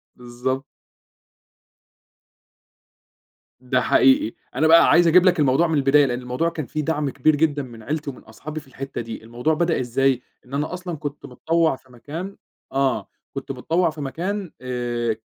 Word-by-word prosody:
بالضبط. 125 +2 -3 3.0
ده 125 0 0
حقيقي، 130 -3 +4 0.2
أنا 155 +5 +3
بقى 165 +1 +7
عايز 175 0 +6
أجيب 180 +3 +6
لك 180 -3 +4
الموضوع 140 +4 +3
من 160 -2 +1
البداية؛ 140 +1 +5
لأن 125 0 -2
الموضوع 125 +7 -1
كان 165 -4 -5
فيه 155 +3 -3
دعم 150 -2 -1
كبير 145 +3 +2
جدًا 145 -1 +1
من 115 -3 -11
عيلتي 150 +3 -3
ومن 130 - -10
أصحابي 155 +8 -8
في 150 - -17
الحتّة 135 0 -6
دي، 115 -1 -7
الموضوع 120 +7 -1
بدأ 165 +1 +1
إزاي؟ 130 +1 +1 0.2
إن 125 - -15
أنا 150 +4 -1
أصلًا 180 -2 -5
كنت 145 0 -6
متطوّع 160 +4 +1
في 130 0 -21
مكان 160 +10 -7 0.4
آه، 130 -7 0 0.3
كنت 135 0 -5
متطوّع 165 +7 +1
في 155 -1 -8
مكان 180 +6 -3
آآ، 120 -2 -2
140 Hz, 160 wpm, -23 LUFS, 125-160 Hz, 3.0 s, بقى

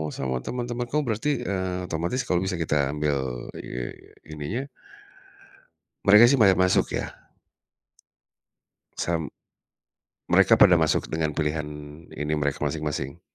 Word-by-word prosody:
sama 65 -1 -2
teman-teman 120 0 -3
kamu 150 +3 +1
berarti, 115 +6 0
eee, 95 -4 -2
otomatis 85 +11 -1
kalau 90 - +2
bisa 95 0 -2
kita 70 -3 +1
ambil, 75 -1 0 0.4
eee, - - -5 0.4
ini 75 -1 -6
nya 130 +4 -2 1.4
mereka 105 +2 +8
sih 135 +3 +3
banyak 95 -5 +5
masuk, 95 0 +2
ya? - - -5 1.8
Sam 80 -3 -1 1.0
mereka - - +6
pada 90 -2 +6
masuk 80 0 0
dengan 80 -2 -1
pilihan 75 -1 -1 0.5
ini 75 +1 -3
mereka 75 -1 -1
masing-masing? 75 0 -3
80 Hz, 120 wpm, -25 LUFS, 75-100 Hz, 1.8 s, mereka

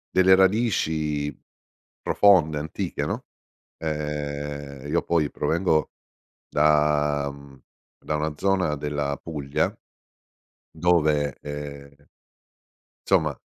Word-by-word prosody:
delle 95 0 +7
radici 80 - +1 0.7
profonde, 85 -7 +4
antiche, 75 +1 -3
no, - - -3 0.5
ehm 75 -2 -3 0.5
io 80 +4 +1
poi 80 -4 +1
provengo 80 0 0 0.6
da 75 -1 +2
mhmm, 70 -1 -15 0.4
da 75 - -1
una 75 0 -2
zona 95 -5 +1
della 75 -1 -2
Puglia 75 -4 -2 1.0
dove, 80 -4 +2
ehm 70 -1 -8 1.1
insomma, 80 -7 +2
75 Hz, 85 wpm, -25 LUFS, 75-80 Hz, 1.1 s, delle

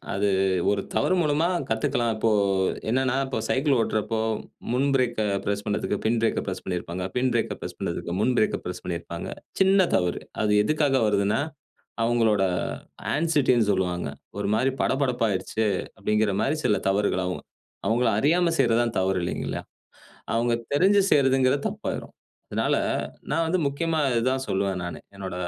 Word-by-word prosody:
அது 100 +1 +1 0.4
ஒரு 100 -1 0
தவறு 185 - +2
மூலமா 155 +1 +2 0.2
கத்துக்கலாம். 120 +1 0
இப்போ 110 +1 +1 0.6
என்னன்னா, 130 +2 +1
இப்ப 130 - -3
சைக்கிள் 135 +1 +2
ஓட்டுறப்போ, 110 0 -1 0.5
முன் 135 +3 +2
பிரேக் 120 -4 +1
அ - - 0 0.2
பிரஸ் 100 0 -2
பண்ணதுக்கு 105 0 -1
பின் 115 +1 +2
பிரேக் 115 - +1
அ - - -6
பிரஸ் 95 - -4
பண்ணிருப்பாங்க, 90 0 -3
பின் 130 +1 +2
பிரேக்க 115 - 0
பிரஸ் - - -7
பண்ணதுக்கு 85 - -3
முன் 130 - +3
பிரேக் 110 - +2
அ - - -14
பிரஸ் 90 - -5
பண்ணிருப்பாங்க. 85 -1 -5 0.3
சின்ன 190 -1 +5
தவறு. 90 -1 +1 0.2
அது 105 -1 +2
எதுக்காக 145 0 +2
வருதுன்னா, 100 +3 +2 0.6
அவங்களோட 115 -4 +3 0.7
ஆன்சிட்டி 150 -4 +2
ன்னு 110 -3 +2
சொல்லுவாங்க. 90 -2 -1 0.3
ஒரு - - -1
மாரி 130 +5 +2
படபடப்பா 130 -3 +1
ஆகிடுச்சு. 105 +3 -1 0.3
அப்படிங்கிற 105 +1 +1
மாரி 145 - +1
சில 105 - +3
தவறுகள் 95 -2 +1
ஆகும். 90 - -4 0.4
அவங்கள 120 +3 +2
அறியாம 170 +6 +3
செய்றதுதான் 115 -2 +2
தவறு 95 0 +1
இல்லைங்களா, 85 - -3 0.7
அவங்க 120 +1 +1 0.2
தெரிஞ்சு 190 +8 +4
செய்றதுங்கிறது 135 0 +3
தப்பாயிரும். - - -5 0.4
அதனால - - +1 0.5
நான் 165 +2 +1
வந்து 175 +3 +1
முக்கியமா 160 +3 -1
இது 115 -1 +1
தான் 130 0 -1
சொல்லுவேன் 95 -1 0
நானு, 85 -4 -5 0.2
என்னோட 95 -2 -5
115 Hz, 155 wpm, -25 LUFS, 100-135 Hz, 0.7 s, சின்ன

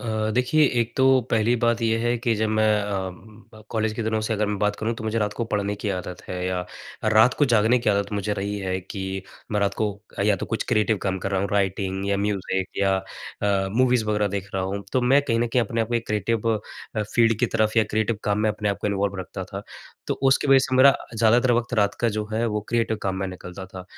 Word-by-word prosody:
अ, 110 -2 -1
देखिए 140 +5 +3 0.2
एक 115 +1 -1
तो 130 - +3 0.3
पहली 115 +2 +3
बात 115 0 +2
ये 115 0 +2
है, 120 +1 +1
कि 115 -1 +1
जब 110 0 0
मैं 110 0 +2 0.2
अ, 95 -2 -2 0.4
ब 110 - -13
कॉलेज 110 -1 0
के 115 - -3
दिनों 110 0 0
से 110 +1 -2
अगर 105 0 0
मैं 105 -1 -2
बात 105 0 +1
करूँ 115 +2 -2
तो 110 - -8
मुझे 110 +1 -1
रात 105 -1 0
को 115 - -3
पढ़ने 100 0 0
की 105 - -1
आदत 90 0 -8
है, 90 0 -3
या 90 -1 -2 0.4
रात 110 +3 +5
को 145 - +5
जागने 115 +3 +4
की 115 -3 +1
आदत 100 0 0
मुझे 105 +1 -1
रही 100 +1 -3
है, 95 -1 -2
कि 95 0 -5 0.3
मैं 105 - +1
रात 100 -1 +1
को 110 - 0 0.4
या 105 -2 +3
तो - - -5
कुछ 115 - -2
क्रिएटिव 110 0 +2
काम 95 -1 -1
कर 95 - -4
रहा 95 -1 +1
हूँ, 100 - -1
राइटिंग 95 -1 -1
या 100 - +2
म्यूज़िक 100 -2 -1
या 95 -1 +3 0.5
अ, 100 -1 +1
मूवीज़ 125 -3 +3
वग़ैरह 105 -1 +1
देख 100 0 -4
रहा 95 - 0
हूँ। 100 +2 -3
तो 130 - +2
मैं 135 +3 +5
कहीं 115 -5 0
न 120 - +2
कहीं 120 0 +2
अपने 115 +1 -2
आप 110 - -1
को 120 - -2
एक 115 -1 -1
क्रिएटिव 105 +2 0
अ, 105 +1 -7
फ़ील्ड 115 +1 +2
की 120 - +3
तरफ 110 0 +1
या 110 - +5
क्रिएटिव 110 0 0
काम 105 0 +1
में 110 0 +2
अपने 105 0 -2
आप 100 - -1
को - - -2
इन्वॉल्व 100 0 -1
रखता - - -6
था। - - -7 0.4
तो - - 0
उसकी 135 +1 +3
वज़ह 135 -1 +7
से 130 - -1
मेरा 135 +1 +7 0.2
ज्यादातर 120 +3 +4
वक़्त 120 +1 0
रात 100 -2 +2
का 120 - +3
जो 105 - -1
है 115 +2 0
वो 105 -1 -1
क्रिएटिव 115 -2 0
काम 95 -1 -1
में 95 0 -2
निकलता 90 +1 -8
था। 95 -1 -9
105 Hz, 255 wpm, -24 LUFS, 100-115 Hz, 0.5 s, वज़ह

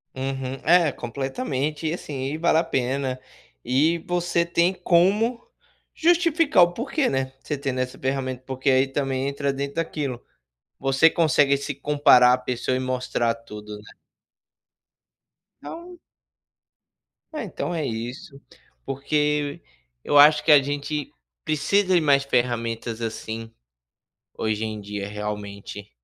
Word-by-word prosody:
Uhum. 135 0 -4
É, 170 -2 +4
completamente, 140 - -3
e 155 - -1
assim, 140 -6 -5
e - - -3
vale 160 -1 +2
a 165 - +3
pena. 130 -3 -2 0.4
E, 155 +6 +2
você 175 0 0
tem 170 +2 +2
como 200 +8 +2 0.5
justificar 330 - +4
o 175 0 +1
porquê, 270 - -1
né, 135 0 -2
você 150 +1 -4
tendo 135 -2 -3
essa 130 0 -3
ferramenta, 130 -1 -3
porque 130 +1 -2
aí, 130 +1 +4
também, 135 -1 -2
entra 140 0 -1
dentro 140 +1 -4
daquilo. 145 -6 -3 0.6
Você 135 +4 +4
consegue 145 -4 +3
se 140 +1 -4
comparar 140 -3 +5
à - - +3
pessoa 125 0 -2
e - - -1
mostrar 125 -2 -1
tudo, 105 -2 -10
né? 105 +1 -15 1.7
Então 350 +1 -9 1.3
É, 305 - -4
então 175 -3 -4
é 155 -3 -2
isso. 130 - -6 0.4
Porque 145 +1 -1 0.4
eu 145 - +2
acho 150 +1 +7
que 160 - +5
a 145 -2 +8
gente 145 +1 -4 0.3
precisa 185 +6 +1
de 175 - +4
mais 140 -2 +3
ferramentas, 115 -3 -1
assim, 115 0 -5 0.8
hoje 110 0 -1
em 110 -1 -5
dia 100 0 -5
realmente, 105 -1 -6
140 Hz, 130 wpm, -24 LUFS, 125-160 Hz, 1.7 s, a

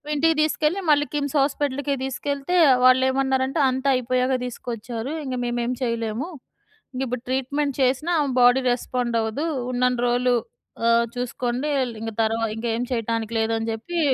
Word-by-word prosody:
ఇంటికి 325 +2 +3
తీసుకెళ్ళి 310 +4 +1
మళ్ళీ 290 0 +4
కిమ్స్ 285 0 -2
హాస్పిటల్‌కే 280 0 0
తీసుకెళ్తే 280 +4 -2 0.3
వాళ్ళేమన్నారంటే 260 +2 +3
అంత 260 +2 -3
అయిపోయాక 255 +1 +1
తీసుకొచ్చారు. 240 +2 -5
ఇంగ 260 -1 -3
మేమేం 240 +1 -1
చేయలేము. 230 +3 -2 0.7
ఇంగ 260 - -3
ఇప్పుడు 245 0 -4
ట్రీట్‌మెంట్ 275 +2 -1
చేసినా 265 +7 +1
ఆమె 280 -2 -1
బాడీ 245 +2 +5
రెస్పాండ్ 245 -1 -2
అవ్వదు. 220 +9 -2 0.3
ఉన్నన్ని 250 0 +1
రోజులు 245 0 +2 0.5
ఆహ్, 235 0 +4
చూసుకోండి 250 +3 -2 0.2
ల్ - - -10
ఇంక 225 - -4
తరువా 225 +1 0
ఇంకేమి 235 +1 -2
చేయటానికి 230 -1 -2
లేదని 225 0 0
చెప్పి 340 +10 -4
255 Hz, 135 wpm, -23 LUFS, 235-275 Hz, 0.7 s, బాడీ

